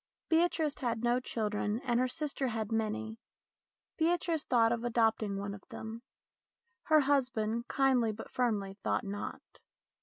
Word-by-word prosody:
Beatrice 320 -3 +2
had 235 -4 -1
no 240 +1 +3
children, 210 -2 -1
and 240 -2 +1
her 255 - +3
sister 280 0 -2
had 225 -2 -3
many. 220 0 -2 0.8
Beatrice 335 -2 +1
thought 230 -2 +3
of 235 -1 -1
adopting 225 -4 +1
one 200 0 -4
of 200 - -9
them. 220 +1 -7 0.8
Her 310 -2 +6
husband, 245 -5 +1
kindly 260 -4 +3
but 215 +1 -9
firmly, 210 -5 -1
thought - - +1
not. 200 +1 -5
235 Hz, 140 wpm, -32 LUFS, 220-270 Hz, 0.8 s, Her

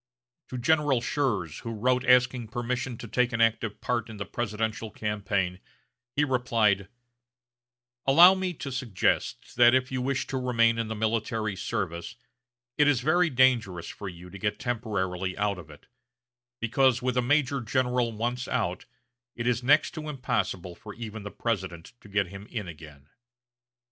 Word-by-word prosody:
To 130 - -6
General 145 0 +3
Schurz, 115 - -1
who 115 - -6
wrote 125 +3 +1
asking 125 -2 +4
permission 120 +1 -3
to 115 - -8
take 125 +3 +1
an 115 - -1
active 115 -1 +1
part 120 -2 -1
in 110 - -8
the 100 - -4
presidential 110 -1 -3
campaign, 100 -4 -2 0.6
he 145 - +3
replied: 115 -7 +2 1.2
"Allow 170 +7 +9
me 185 -2 -2
to 140 -1 -6
suggest 125 -6 -1
that 120 +1 +7
if 130 0 +1
you 130 -1 -1
wish 135 +1 -1
to 135 - -3
remain 115 -2 +2
in 115 - -1
the 110 - -4
military 110 -1 -1
service, 85 -2 -3 0.6
it 150 - +6
is 140 -4 +3
very 175 +5 +3
dangerous 120 - +2
for 100 - -6
you 90 0 -11
to 100 - -9
get 105 0 -1
temporarily 95 -6 -2
out 100 -2 0
of 80 -4 -12
it; 75 - -15 0.7
because, 125 +2 +2
with 125 -1 0
a 125 - +3
major 140 +1 +2
general 125 0 +1
once 120 +3 -2
out, - - -1 0.5
it 115 - -4
is 120 -1 +1
next 145 +4 +4
to 155 -3 -6
impossible 105 - -2
for 105 +3 -11
even 110 -1 -7
the 100 - -6
President 95 -8 -3
to 105 - -15
get 100 0 +1
him 100 +2 -10
in 105 -5 -4
again.... 75 -4 -12
115 Hz, 165 wpm, -27 LUFS, 100-125 Hz, 1.2 s, Allow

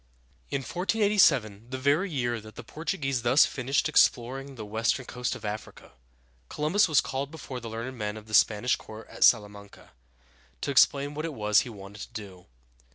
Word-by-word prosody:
In 140 - -2
1487, 165 - +2
the 130 - -4
very 145 +9 +1
year 120 -6 -2
that 110 0 -13
the - - -9
Portuguese 145 -6 -3
thus 125 +5 +5
finished 130 +1 -1
exploring 135 +3 +1
the 110 -3 -7
western 115 +4 -1
coast 125 0 -3
of - - -10
Africa, 105 -8 -7 0.6
Columbus 170 +8 +2
was 155 -3 +4
called 135 +1 -4
before 145 -5 -8
the 115 -1 -8
learned 115 +4 -5
men 105 0 -3
of 110 - -11
the 110 - -12
Spanish 110 +3 +3
court 110 +1 -11
at - - -2
Sal 115 -4 +6
a - - -11
man´ca, 100 0 -15 0.7
to 140 - -2
explain 140 +1 +3
what 155 +2 -4
it 160 -3 -5
was 105 -2 +3
he - - -3
wanted 100 -1 -11
to - - -31
do. 95 -5 -9
125 Hz, 185 wpm, -27 LUFS, 110-140 Hz, 0.7 s, Sal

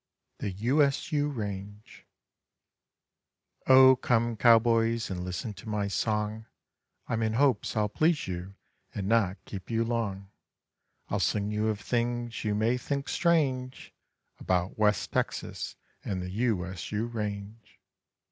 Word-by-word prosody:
THE - - -2
U 120 +10 +1
S 140 +3 +1
U 145 -1 +1
RANGE 105 -4 -7 1.6
O 130 0 +8
come 120 -2 +1
cowboys 115 -1 +4
and 90 -1 -3
listen 90 +4 -4
to 100 +3 -10
my 105 -1 -1
song, 105 +1 -1 0.6
I'm 115 -1 -1
in 110 0 0
hopes 125 -4 +1
I'll 105 -1 +2
please 155 +8 +1
you 90 +2 -6 0.4
and 100 -2 -3
not 105 -3 +2
keep 95 -3 -8
you 115 0 +1
long; 105 -5 -3 0.8
I'll - - 0
sing 105 0 0
you 105 +1 0
of 110 -2 -1
things 120 0 -2
you 105 -2 0
may 115 +4 +1
think 140 +1 -3
strange 135 -7 0 0.5
About 90 +1 0
West 105 -3 +1
Texas - - -3 0.3
and 95 -2 -3
the 90 0 -5
U 105 -3 0
S 95 0 -7
U 105 +2 -1
range. 105 -1 -6
110 Hz, 140 wpm, -29 LUFS, 100-120 Hz, 1.6 s, O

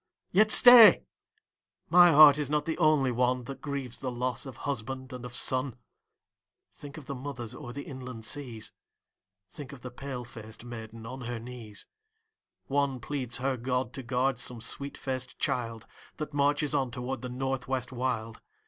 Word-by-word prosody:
Yet 215 +3 +4
stay, 235 -4 +9 0.8
my 175 +1 +7
heart 150 -1 +8
is 145 -2 -2
not 150 0 0
the 165 +1 -3
only 155 -5 +3
one 125 +1 +1
That 135 +3 -8
grieves 140 -4 -4
the 130 - -4
loss 125 +1 -3
of 130 - -9
husband 130 0 -4
and 125 -1 -7
of 125 -1 -6
son; 130 -1 0 1.0
Think 145 0 -11
of 155 - -10
the 140 - -5
mothers 130 -4 -6
o'er 120 - -8
the 140 +3 -6
inland 125 -4 -8
seas; 120 -4 -5 0.7
Think 130 +7 -10
of 135 - -12
the 125 - -8
pale 125 -1 -6
faced 110 -1 -11
maiden 115 -1 -9
on 130 +3 -7
her 120 0 -4
knees; 115 -3 -8 0.8
One 140 -2 0
pleads 125 0 -4
her 130 +1 -1
God 125 0 -2
to 135 - -5
guard 130 +2 0
some 120 -2 -5
sweet 140 +5 -5
faced 130 -1 -4
child 115 -2 -2 0.3
That 155 -1 -5
marches 145 +1 +1
on 130 -2 +1
toward 125 +1 -5
the 125 - -5
North 130 +1 -3
West 130 -1 -2
wild. 120 -3 -3
130 Hz, 170 wpm, -29 LUFS, 120-140 Hz, 1.0 s, stay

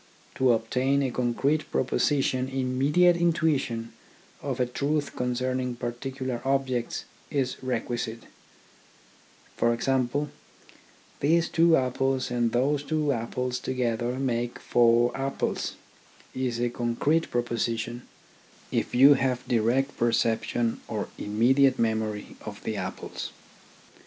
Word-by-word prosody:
To 130 -1 +3
obtain 130 +5 +1
a 130 - -1
concrete 130 +5 0
proposition 130 -1 +1
immediate 135 +7 +3
intuition 145 -9 0 0.5
of 135 -2 -3
a 125 - +3
truth 145 +4 -1
concerning 125 0 -1
parti 120 +2 -4
cular 130 -2 -4
objects 135 -3 -1 0.2
is 130 -3 -1
requisite; 120 -2 -3 1.3
for 120 - +2
example, 135 +3 0 0.5
" - - -28
these 165 +4 +2
two 165 0 +5
apples 130 0 0
and 120 -1 +1
those 140 +4 +1 0.3
apples 125 +2 -2
together 125 -1 -1
make 120 -2 -1
four 120 0 +3
apples 135 0 -2 0.3
" - - -27
is 120 -2 -2
a 120 0 0
concrete 125 +8 0
proposition, 120 0 -2 0.7
if - - -1
you 135 +3 +8
have 130 -2 -1
direct 120 +4 +1
perception 115 0 +1
or 105 -3 -3
immediate 130 +6 +3
memory 110 -2 -1
of - - -8
the - - -2
apples. - - -5
125 Hz, 110 wpm, -27 LUFS, 120-135 Hz, 1.3 s, you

